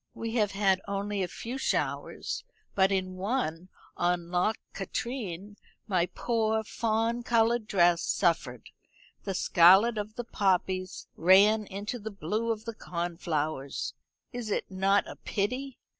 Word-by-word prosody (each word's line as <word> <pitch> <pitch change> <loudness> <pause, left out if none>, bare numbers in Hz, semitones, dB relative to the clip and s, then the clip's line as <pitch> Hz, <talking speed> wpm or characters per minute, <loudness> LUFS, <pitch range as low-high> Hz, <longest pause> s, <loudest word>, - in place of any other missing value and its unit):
We 225 0 -4
have 210 -4 +1
had 195 -1 +2
only 200 0 -2
a 185 - 0
few 245 +8 -6
showers, - - -2 0.3
but 190 0 +3
in 185 -1 -1
one, 185 -5 -2 0.3
on 175 -1 0
Loch 180 +5 +1 0.2
Katrine, 205 -2 -5 0.3
my 180 -4 +2
poor 220 -1 0
fawn 225 +2 0
coloured 235 -1 +2
dress 175 -4 +4
suffered. 160 - 0 0.5
The 195 - -2
scarlet 195 +6 +6
of 210 +1 -5
the 240 - -4
poppies 185 -3 0
ran 200 +5 +5
into 205 +5 -5
the 220 +1 -5
blue 215 +3 -2
of 220 -1 -4
the 230 - -4
cornflowers. 165 -7 -3 0.4
Is 240 -3 -4
it 205 - -2
not 195 +1 +2
a - - -9
pity? 250 +6 -3
200 Hz, 135 wpm, -29 LUFS, 185-225 Hz, 0.5 s, scarlet